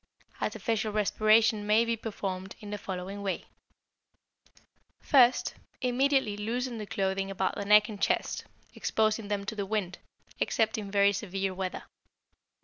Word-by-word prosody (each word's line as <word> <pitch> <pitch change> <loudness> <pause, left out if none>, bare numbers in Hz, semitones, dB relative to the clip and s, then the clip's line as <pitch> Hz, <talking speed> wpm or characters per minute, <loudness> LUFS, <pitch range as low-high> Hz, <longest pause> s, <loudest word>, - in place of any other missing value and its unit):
Artificial 220 -2 -1
respiration 215 +1 +3
may 220 +2 +4
be 230 0 0
performed 195 -4 -5
in 210 -2 -9
the 210 - -4
following 190 +2 -5
way: 195 -1 -3 1.5
First 255 -4 +4 0.3
Immediately 255 -3 +2
loosen 235 +3 -2
the 210 - -6
clothing 195 0 -1
about 190 -1 -1
the 200 - -4
neck 210 +1 +6
and 210 -3 -8
chest, - - 0 0.3
exposing 215 -1 0
them 200 -1 -2
to 220 - -3
the 205 - -2
wind, 195 -4 -2 0.4
except 220 0 +1
in 205 -2 -6
very 200 0 +4
severe 195 -1 -2
weather. 185 0 -4
210 Hz, 140 wpm, -29 LUFS, 195-225 Hz, 1.5 s, neck